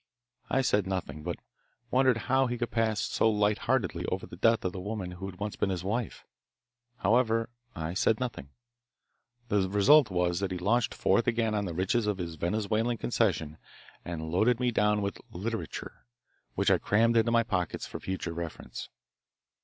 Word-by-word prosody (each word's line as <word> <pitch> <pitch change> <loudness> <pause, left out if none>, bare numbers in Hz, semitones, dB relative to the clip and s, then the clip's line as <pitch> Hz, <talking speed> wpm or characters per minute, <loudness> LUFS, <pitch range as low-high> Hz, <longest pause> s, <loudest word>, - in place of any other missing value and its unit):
I 135 - +2
said 105 -6 +1
nothing, 95 -5 -3
but 85 +1 -4 0.5
wondered 130 -2 +4
how 130 0 +3
he 120 0 -2
could 120 0 -3
pass 110 -2 +1
so 110 - +2
lightheartedly 105 -1 +1
over - - -2
the - - -10
death 115 -2 +2
of 90 - -1
the 95 - -5
woman 100 -2 -4
who 95 +2 -6
had 95 - -8
once 105 0 -3
been 100 - 0
his 90 -2 -2
wife. 110 +3 -3 0.7
However, 115 +1 +2 0.3
I 80 +1 -3
said 110 +4 +2
nothing. 120 - -4 1.0
The 100 -2 +2
result 115 +7 +6
was 90 -1 0
he 100 - 0
launched 115 +6 +1
forth 120 - +2
again 115 -2 +1
on 105 -1 0
the 85 -3 -4
riches 100 +5 +1
of 105 -2 0
his 85 -3 -4
Venezuelan 110 +7 0
concession 80 -11 0 0.4
and 80 -2 -5
loaded 110 +7 +3
me 125 -1 +1
down 105 -2 +2
with 100 - -3
"literature," 105 - -5 0.5
which - - +2
I - - +4
crammed 115 +3 +3
into 115 0 +3
my 115 0 +4
pocket 90 -6 -2
for - - -6
future 95 -3 -4
reference. 85 -1 -6
105 Hz, 170 wpm, -29 LUFS, 90-115 Hz, 1.0 s, result